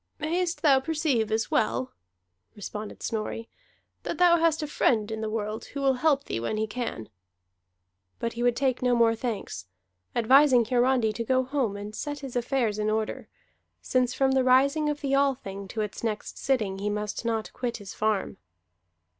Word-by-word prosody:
"Mayest 335 +3 -1
thou 275 -4 +6
perceive 270 -7 0
as 220 0 0
well," 120 +4 0 0.6
responded 210 +1 -7
Snorri, 225 +1 -3 0.5
"that - - -4
thou 350 -1 +6
hast 325 -1 +2
a - - -3
friend 225 -6 +1
in 220 0 -4
the 220 - -2
world 215 0 -3
who 280 - -7
will 270 -1 +3
help 290 -3 +3
thee 115 - -3
when 115 - -2
he 220 - +1
can." 220 - -5 1.1
But 230 - -3
he 235 - -5
would 245 -1 +3
take 260 -2 0
no 250 -1 +3
more 230 -1 +4
thanks, 215 - -4 0.5
advising 255 +1 +5
Hiarandi 245 -2 +2
to 230 - -3
go 260 +2 +2
home 255 -6 -1
and 205 +1 -7
set 290 -1 -5
his 270 -3 -7
affairs 240 -3 0
in 210 0 0
order, 215 0 -2 0.5
since 255 -1 0
from 270 -1 +2
the 265 -1 +3
rising 280 +4 +4
of 295 0 -3
the 275 -2 -1
Althing 245 -9 -1
to 215 +3 -3
its 210 +1 -5
next 215 -2 -3
sitting 215 -8 -1
he 205 +1 -1
must 210 +1 -3
not 225 -2 -2
quit 245 -2 -3
his 205 -3 -9
farm. 215 -2 -1
240 Hz, 180 wpm, -27 LUFS, 215-270 Hz, 1.1 s, thou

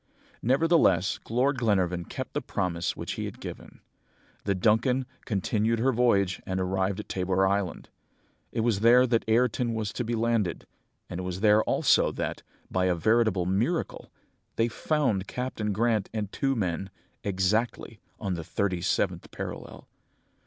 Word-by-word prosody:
"Nevertheless, 130 - +3
Lord 130 +4 +1
Glenarvan 90 -6 +1
kept - - -6
the - - -1
promise 85 -1 -2
which - - -4
he - - -3
had - - -7
given. - - -9 0.6
The 100 -1 +1
Duncan 115 +7 +2 0.2
continued 110 +2 0
her 130 +4 +2
voyage 100 -6 +2
and 95 0 -3
arrived 95 +1 0
at 105 - -7
Tabor 95 +1 +1
Island. 95 -2 -1 0.6
It 115 - -1
was 110 -3 +1
there 120 +3 +6
that 115 -2 +1
Ayrton 120 0 +2
was 110 -2 -3
to 125 - -2
be 120 +1 -2
landed, 115 -6 0 0.4
and 85 - -6
it - - -4
was 90 +1 -4
there 105 0 +5
also - - +3
that, - - -3 0.3
by 95 0 +1
a 90 -1 +2
veritable 110 0 +2
miracle, 110 - -1 0.4
they 115 - +2
found 120 -6 0
Captain 125 -4 -3
Grant 110 0 +1
and 105 -2 -3
two 135 -1 0
men, 95 -3 -2 0.3
exactly 105 +3 -1 0.2
on 100 -3 -2
the 85 -2 -4
thirty 90 +1 -1
seventh 90 -1 -1
parallel. - - -7
105 Hz, 150 wpm, -27 LUFS, 95-120 Hz, 0.6 s, there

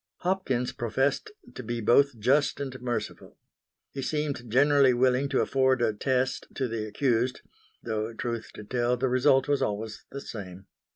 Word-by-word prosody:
Hopkins 175 -10 0
professed 135 - -1 0.2
to - - -7
be 120 0 -4
both 120 +4 +3
just 135 +8 +2
and 130 -3 -5
merciful. 120 -1 -4 0.5
He 135 - -5
seemed 145 -5 -3
generally 140 0 +5
willing 130 +2 +2
to 135 - +2
afford 130 -1 +2
a 110 -2 +2
"test" 130 +3 -1
to 130 - -1
the 110 -2 -3
accused; 125 +1 0 0.4
though, 110 0 -2
truth 115 0 -4
to - - -8
tell, 120 +2 0
the 130 +2 0
result 130 +2 +3
was 145 -1 +1
always 105 +1 -3
the 140 - -7
same. 95 -6 -8
125 Hz, 160 wpm, -27 LUFS, 115-135 Hz, 0.5 s, generally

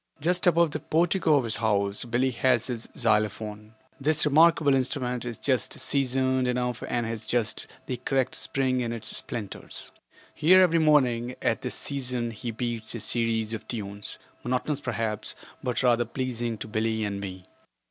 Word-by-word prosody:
Just 175 +4 +1
above 170 -2 +4
the 155 - -2
portico 165 0 +2
of 140 - +3
his 115 -2 0
house 100 -1 0
Billie 125 +3 +1
has 125 -1 +2
his 120 -3 -4
xylophone. 105 -1 0 0.2
This 150 +2 +3
remarkable 155 0 +5
instrument 125 -2 0
is 120 -3 -4
just 130 -3 0
seasoned 130 -1 +1
enough 125 -1 -1
and 120 -1 0
has 115 -1 -4
just 120 -3 0 0.2
the 125 - -3
correct 130 +1 0
spring 130 -2 0
in 115 -1 -2
its 110 -2 -5
splinters. 105 -5 -6 0.4
Here 185 +5 +6
every 165 -2 +3
morning, 130 -6 +3
at - - 0
this - - -3
season, 125 -4 -1
he 115 +2 -6
beats 115 -1 -4
a - - -4
series 115 0 -1
of 110 - -6
tunes, 100 -3 -5 0.3
monotonous 130 +4 -1
perhaps, 110 -4 -3 0.3
but 125 0 -1
rather 120 -1 +4
pleasing 120 -2 -3
to - - -6
Billie 110 0 0
and 100 -1 -2
me. 95 -2 -7
120 Hz, 160 wpm, -27 LUFS, 110-135 Hz, 0.4 s, Here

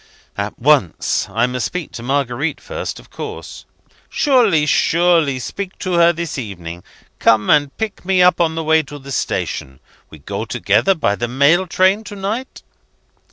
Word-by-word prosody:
"At 100 +1 -4
once. 130 - +2
I 115 +2 +1
must 125 -1 -2
speak 180 -4 -6
to - - -8
Marguerite 135 +3 -1
first, - - -6
of - - -18
course!" - - -8 0.4
"Surely! 230 - +3
surely! 165 -3 +2
Speak 190 +10 -6
to 185 -2 -3
her 170 0 +5
this 170 -4 -4
evening. 90 -6 -7 0.4
Come, 110 -2 +3
and 145 -1 +2
pick 220 -2 -4
me 190 0 +1
up 180 0 +5
on 160 -1 +1
the 165 - -2
way 160 0 +4
to 145 0 -10
the 140 0 -11
station. 65 - -3 0.3
We 80 - -12
go 70 - -5
together 110 - +1
by 155 - +1
the 120 - -2
mail 140 +9 +3
train 190 +4 +2
to 205 - -8
night?" 215 +7 -5
150 Hz, 165 wpm, -18 LUFS, 120-180 Hz, 0.4 s, her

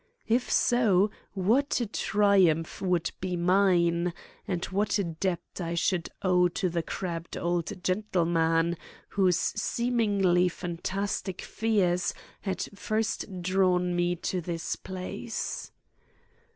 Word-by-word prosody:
If 240 +2 +1
so, 215 -5 +3 0.2
what 225 +11 +2
a 240 - 0
triumph 195 -6 +2
would 180 -3 +1
be 185 -1 -2
mine; 175 -1 +3 0.3
and 180 -3 -1
what 205 +3 0
a 200 - +1
debt 170 +1 -2 0.2
I 170 -1 -2
should 175 0 0
owe 180 -1 +4
to 180 +1 -1
the 170 0 -1
crabbed 170 -1 -5
old 175 +1 -2
gentleman 170 -4 +1 0.3
whose 185 -3 +3
seemingly 205 -6 +1
fantastic 185 +2 -3
fears 195 -5 +1 0.2
had 190 -3 -2
first 210 -2 -2
drawn 180 -1 +2
me 175 0 +1
to 180 +1 -2
this 165 -1 -3
place! 190 +4 -5
185 Hz, 110 wpm, -28 LUFS, 175-200 Hz, 0.3 s, owe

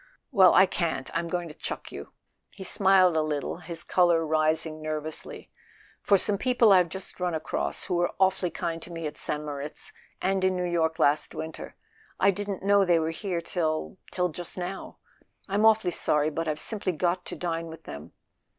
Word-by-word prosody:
"Well—I 190 -4 +7
can't. 165 -7 -2
I'm 170 +1 -1
going 175 0 -2
to 155 - -9
chuck - - -6
you." - - -8 0.4
He 195 - -10
smiled 190 -3 +4
a 160 - +3
little, 150 -1 -2
his 170 -1 -7
colour 175 -3 +3
rising 155 0 0
nervously. 155 0 -5 0.5
"For 200 - +4
some 200 +1 -1
people 245 -5 +4
I've 180 -2 +5
just 190 +2 -7
run 180 -2 -1
across—who 160 +3 -3
were 175 0 0
awfully 190 -1 +2
kind 165 -1 -4
to 175 - -9
me 165 -1 -5
at 150 0 -4
St. 150 0 -3
Moritz—and 150 +6 -4
in 185 0 +2
New 180 0 -1
York 165 -2 0
last 145 +2 +2
winter. 160 0 -7 0.4
I 195 - +5
didn't 200 0 -4
know 200 0 +5
they 175 -3 +4
were 160 0 0
here 175 +1 -3
till... 165 +1 -2
till 180 -1 0
just 175 +3 -8
now. 185 +2 -6 0.5
I'm 205 +2 +3
awfully 220 -5 +3
sorry; 150 -2 +1
but 165 +2 -3
I've 155 0 -1
simply 200 -4 -1
got 175 +2 0
to - - -6
dine 165 -1 -3
with 160 0 -10
them." 70 +1 -9
175 Hz, 180 wpm, -27 LUFS, 160-190 Hz, 0.5 s, Well—I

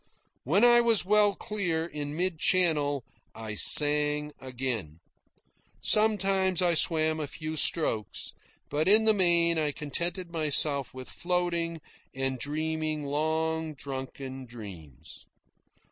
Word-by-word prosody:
When 180 - +2
I 240 0 +6
was 230 -5 +2
well 205 0 +3
clear, 175 -6 -3
in 150 -3 -6
mid 175 -1 -1
channel, 150 -8 +2 0.3
I 110 -1 -7
sang 150 +4 +4
again. 125 - -5 0.8
Sometimes 195 -4 +1
I 175 -1 +2
swam 160 -1 +1
a 150 - -3
few 155 +2 -6
strokes, 145 -9 0 0.3
but 150 +3 -2
in 215 +3 +5
the 220 - +5
main 170 -4 +2
I 150 -1 -1
contented 170 +5 -3
myself 150 -3 0
with 130 0 -10
floating 170 -2 -2 0.3
and 135 -1 -2
dreaming 155 +2 -3
long 160 +2 -2
drunken 135 -1 -8
dreams. 95 - -12
155 Hz, 115 wpm, -27 LUFS, 140-175 Hz, 0.8 s, I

